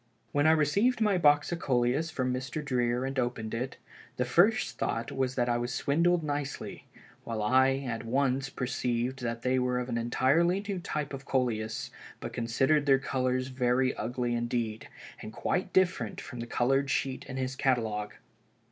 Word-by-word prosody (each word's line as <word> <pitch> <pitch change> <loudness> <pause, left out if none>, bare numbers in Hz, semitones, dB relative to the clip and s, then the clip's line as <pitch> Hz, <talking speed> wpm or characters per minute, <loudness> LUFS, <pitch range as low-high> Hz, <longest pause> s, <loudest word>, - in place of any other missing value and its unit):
"When 145 +1 +3
I - - +7
received 200 - +2
my 210 -4 +2
box 145 -1 +4
of 170 - -2
Coleus 130 +3 +1
from 130 -5 -1
Mr. 130 +4 -4
Dreer 125 -1 0
and 135 0 -2
opened 120 -3 -2
it, 125 +4 -3 0.4
the 125 - +1
first 165 - +3
thought 115 0 -2
was 130 -1 -1
that 125 -2 +1
I 120 0 +1
was 120 +1 -2
swindled 170 +6 +2
nicely, 145 -1 -4 0.4
while 110 -2 -3
I 130 +4 +4
at 115 -1 -3
once 135 +2 0
perceived 125 0 -2
that 115 -1 -3
they 130 0 +2
were 125 0 0
of 125 0 -3
an 120 -1 -1
entirely 145 +10 +2
new 195 -3 -2
type 150 -4 -4
of 135 0 -7
Coleus, 110 -5 -1 0.3
but - - -6
considered 135 +6 +1
their 135 -1 +6
colors 130 -1 -1
very 130 0 +1
ugly 120 +2 -2
indeed, 120 -2 -2 0.3
and 110 - -7
quite 180 - -1
different 180 - +1
from 120 - -8
the 120 - -5
colored 135 +4 +1
sheet 135 -1 -1
in 130 - -6
his 130 0 -2
catalogue. 110 -6 0
130 Hz, 175 wpm, -29 LUFS, 120-145 Hz, 0.4 s, I